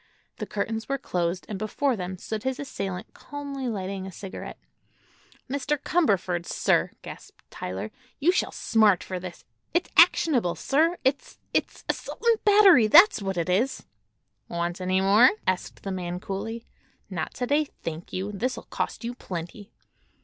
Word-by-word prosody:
The - - -5
curtains 220 +2 -3
were 275 - +1
closed 180 -7 -2
and 205 -3 -5
before 245 +5 0
them 185 -2 -5
stood 215 +3 -5
his 260 +2 -2
assailant 195 -9 -5
calmly 280 -2 -6
lighting 195 -3 -4
a - - -7
cigarette. 190 +2 -8 0.9
"Mr. 280 +2 -1
Cumberford, 195 - +1
sir," - - +2
gasped - - -11
Tyler, 95 +4 -5 0.3
"you 315 +5 +4
shall 370 - 0
smart 215 -5 +3
for 185 -1 -4
this! 180 -1 -9 0.3
It's 350 - +1
actionable, 240 - +5
sir. 325 +5 +2
It's—it's—assault 275 - -3
'n' 460 -2 +4
battery; 400 - +7
that's 340 - +7
what 195 -2 -3
it 170 - 0
is!" 210 +9 +1 0.7
"Want 170 +1 -3
any 185 +1 +1
more?" 205 +6 +7 0.2
asked 185 -1 -2
the 195 - -3
man 180 -1 -4
coolly. 220 +5 -5 0.5
"Not 165 -4 -4
to 250 - -2
day, 290 +4 +2 0.2
thank 165 +1 -5
you. 190 +3 -3
This'll 240 +6 -3
cost - - -4
you 235 +1 -3
plenty." 195 -1 -7
210 Hz, 150 wpm, -26 LUFS, 185-270 Hz, 0.9 s, battery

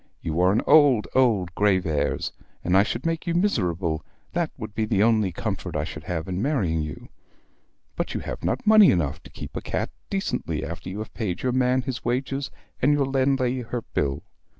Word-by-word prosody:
You 80 +1 -2
are 90 +1 +5
an 105 - +1
old, 140 -8 +6
old 105 -9 +2
Graveairs, 90 -8 +1 0.3
and 90 - +2
I 95 - +7
should 115 +6 -2
make 165 +1 -1
you 170 - 0
miserable, 90 - 0 0.3
that 170 -2 0
would 110 -4 -7
be 110 +1 0
the 105 -2 +2
only 110 -4 +3
comfort 80 - -4
I 75 - 0
should 75 0 -7
have 80 -1 -3
in 90 +1 -2
marrying 100 - +1
you. 75 -2 -7 0.9
But - - -3
you - - -2
have - - -6
not - - -1
money 215 -3 +8
enough 75 -6 0
to - - -14
keep - - -9
a - - -3
cat - - -3 0.2
decently 140 - -2
after 85 +2 -6
you 95 - -6
have 110 0 -6
paid 95 -6 -3
your 130 - +1
man 130 0 +2
his 130 -2 -4
wages, 135 +3 -1 0.3
and 140 - +4
your 145 -1 +3
landlady 130 -1 +1
her 120 0 -4
bill. 70 -1 -1
110 Hz, 195 wpm, -25 LUFS, 90-135 Hz, 0.9 s, money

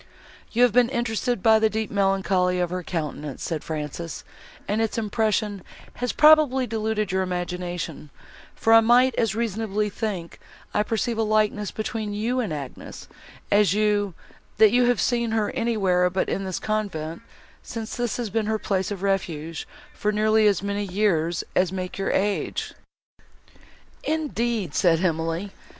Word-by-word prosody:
"You 240 +2 +3
have 245 - +5
been 245 -1 +4
interested 240 -3 -1
by 220 -1 +6
the 220 0 +3
deep 220 0 -3
melancholy 195 -2 +1
of 175 -1 0
her 180 0 -2
countenance," 150 -5 -4
said 160 -3 -3
Frances, 155 0 -5 0.4
"and 210 +2 0
its 225 0 -1
impression 215 -2 0 0.4
has 245 0 -1
probably 300 -4 +5
deluded 220 -3 -1
your 190 0 +1
imagination; 180 -3 -4 0.5
for 225 - +3
I 225 - +10
might 245 +3 +5
as 225 -3 0
reasonably 215 -2 -1
think 195 -7 -4 0.3
I 210 - +2
perceive 225 +2 -1
a - - +3
likeness 215 -1 +1
between 215 -1 -4
you 235 +5 -1
and 220 -8 -1
Agnes, 140 -4 -7 0.4
as 205 -2 +4
you, 205 -3 +1 0.4
that 215 -2 +7
you 245 0 +4
have 245 -2 +2
seen 235 -2 +1
her 215 -2 +1
anywhere 200 -8 +1
but 185 +1 -1
in 195 - -2
this 185 -2 -3
convent, 190 -7 -3 0.4
since 225 -1 -6
this 240 -3 -2
has 235 -4 -3
been 220 +1 0
her 220 0 +1
place 190 -3 -1
of 200 -2 -5
refuge, 165 -5 -2 0.3
for 210 - -1
nearly 215 0 +3
as 200 -2 +2
many 200 0 -2
years 180 -4 0
as 185 -1 +2
make 185 0 -5
your 195 - -1
age." 200 +1 -1 1.3
"Indeed!" 240 - -1
said 165 -2 +3
Emily. 165 +3 -1
210 Hz, 155 wpm, -24 LUFS, 180-225 Hz, 1.3 s, I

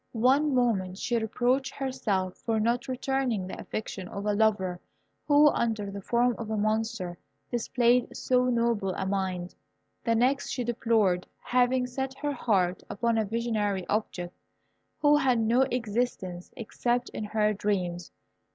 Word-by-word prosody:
One 270 +5 +3
moment 195 -7 +1
she 240 +3 -1
reproached 245 +4 0
herself 215 -9 -1
for 225 -2 0
not 235 +4 0
returning 260 -5 -1
the 185 - -7
affection 195 -4 -5
of 200 +2 -6
a 210 - +2
lover 205 -4 +1 0.5
who, 295 0 +7
under 220 -6 -1
the 200 0 -6
form 240 +4 +2
of 225 -2 -5
a 220 - -1
monster, 215 -4 -1 0.3
displayed 240 0 +2
so 250 -1 +2
noble 230 -6 +1
a 190 - -2
mind; 190 -2 -2 0.5
the 230 -1 +2
next 265 +4 +2
she 250 - -2
deplored 225 -6 +1 0.2
having 250 +1 +2
set 265 +1 -4
her 290 +1 -2
heart 190 -8 +1
upon 230 +1 0
a 220 - +1
visionary 210 -4 -1
object, 180 -4 -2 0.6
who 295 0 +5
had 265 -4 +3
no 235 +4 +3
existence 215 -6 -2
except 240 +2 -1
in - - -5
her 210 0 +1
dreams. 180 -4 -2
225 Hz, 145 wpm, -28 LUFS, 200-250 Hz, 0.6 s, who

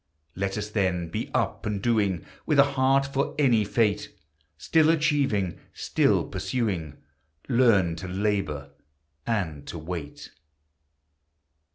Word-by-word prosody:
Let 95 +1 -2
us, 105 0 -3
then, 90 -5 0
be - - -4
up - - -1
and 105 -2 -1
doing, 100 -6 +1 0.2
With 150 - +2
a 140 - +9
heart 135 +1 +3
for 140 0 -2
any 125 -7 +4
fate; 105 0 0 0.5
Still 160 - +3
achieving, 145 - +1 0.2
still - - +2
pursuing, 90 - -3 0.5
Learn 115 -9 +3
to 95 +3 -6
labor 90 -7 -2 0.6
and 85 -11 -2
to - - -6
wait. 80 -2 -7
105 Hz, 115 wpm, -26 LUFS, 90-130 Hz, 0.6 s, a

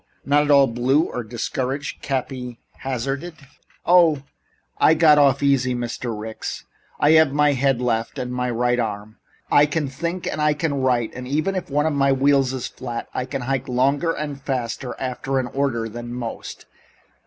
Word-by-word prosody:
"Not 145 +1 +3
at - - -4
all 140 -1 +7
blue 130 +5 +2
or 125 -7 -4
discouraged?" 130 +5 -4
Cappy 130 -3 -4 0.2
hazarded. 135 +6 -3 0.5
"Oh, 170 -5 +5 0.6
I 160 - +5
got 155 -2 +6
off 140 -1 +4
easy, 130 -3 +2
Mr. 120 -2 -4
Ricks. 110 +1 -6 0.3
I 145 - +4
have 160 -3 +5
my 150 0 +3
head 135 -1 +1
left 115 -2 -1
and 125 0 -4
my 125 0 -1
right 120 +1 +1
arm. 105 -1 -4 0.3
I 145 +1 +6
can 150 0 -1
think 170 +6 -4
and 155 - -2
I 150 0 +3
can 150 0 -1
write, 125 -3 +1
and 125 0 -7
even 155 +8 0
if 185 -5 -4
one 145 +2 +1
of 160 - +1
my 140 -1 +3
wheels 135 -1 +3
is 130 -2 -4
flat, 120 -2 -6
I 125 - -2
can 130 0 -4
hike 135 +1 -2
longer 140 +6 +1
and 145 -3 -5
faster 125 -2 -3
after 135 +1 -2
an 130 - 0
order 130 -5 0
than 120 +2 -7
most. 120 -2 -6
135 Hz, 175 wpm, -22 LUFS, 125-145 Hz, 0.6 s, all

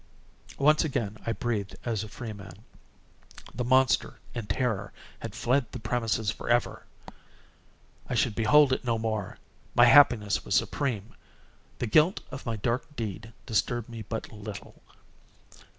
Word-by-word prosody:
Once 150 +2 +4
again 120 -9 -2
I - - +2
breathed 110 -4 -2
as 110 -4 -1
a - - -7
freeman. 100 -4 -9 0.9
The 125 - -2
monster, 130 +1 +3 0.2
in 115 -4 -5
terror, 100 -1 -1 0.3
had - - -7
fled 125 0 +1
the - - -6
premises 110 -2 -1
forever! 120 +2 -1 1.2
I - - -1
should 115 -1 +2
behold 130 +6 +5
it - - -2
no 120 -2 0
more! 110 -3 -3 0.4
My 120 - +7
happiness 120 -6 +5
was - - -1
supreme! 120 -6 -1 0.6
The - - -2
guilt 155 - +3
of 130 0 -8
my 115 - -1
dark 120 +7 -2
deed 110 -1 -5
disturbed 120 +2 -1
me 115 -1 -7
but 110 +2 -5
little. 105 -2 -9
115 Hz, 135 wpm, -28 LUFS, 105-125 Hz, 1.2 s, My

